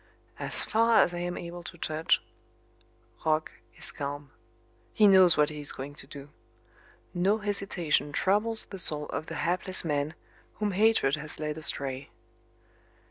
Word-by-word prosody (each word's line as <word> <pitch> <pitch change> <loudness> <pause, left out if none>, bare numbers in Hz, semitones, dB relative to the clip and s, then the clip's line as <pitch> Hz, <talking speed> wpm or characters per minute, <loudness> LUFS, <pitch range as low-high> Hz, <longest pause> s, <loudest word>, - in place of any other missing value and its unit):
As - - +2
far 230 +1 +3
as 175 - -2
I 175 - -4
am 175 0 -3
able 175 0 -7
to 170 - -10
judge, 155 0 0 1.0
Roch 155 0 +1 0.2
is - - -6
calm. 145 0 -6 0.6
He 215 - +5
knows 185 -4 +7
what 150 0 +3
he 150 - -7
is 145 - -3
going 140 +2 -7
to 135 - -11
do. 140 0 -10 0.8
No 190 +4 +2
hesitation 195 -8 -1
troubles 210 +7 +1
the 195 - -8
soul 150 -3 +3
of 155 - -4
the - - -6
hapless 185 +1 0
man 150 +1 -1 0.4
whom 210 -1 -1
hatred 195 -8 +3
has 150 0 -5
led 150 -1 -3
astray. 140 -3 -3
165 Hz, 150 wpm, -28 LUFS, 150-190 Hz, 1.0 s, knows